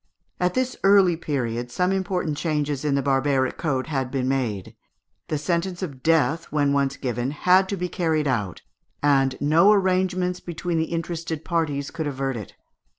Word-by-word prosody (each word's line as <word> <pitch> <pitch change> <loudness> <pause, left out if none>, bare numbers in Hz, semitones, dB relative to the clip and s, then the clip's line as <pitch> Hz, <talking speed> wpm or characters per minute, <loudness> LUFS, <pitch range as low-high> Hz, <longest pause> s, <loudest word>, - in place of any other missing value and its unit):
At 180 0 0
this 255 0 0
early 195 -3 +5
period 120 -7 -3
some 180 +9 0
important 185 -5 -1
changes 150 -3 -1
in 145 -2 +1
the 140 - 0
barbaric 135 -1 +1
code 135 -5 -1
had 135 -5 -2
been 130 -1 -1
made: 120 -8 -2 0.5
the 155 - -1
sentence 175 +4 -2
of 140 -7 -6
death 165 +1 +2
when 145 -1 +1
once 140 -1 0
given 125 -1 -2
had 185 +6 +3
to 200 - -2
be 180 0 -2
carried 160 -4 0
out, 105 -9 -2 0.4
and 135 -2 +2
no 165 +7 +5
arrangements 185 -2 +1
between 170 0 -3
the 160 - +1
interested 165 -1 -4
parties 150 -5 -1
could 160 -2 -3
avert 135 -2 -2
it. 105 -4 -8
150 Hz, 165 wpm, -24 LUFS, 135-180 Hz, 0.5 s, early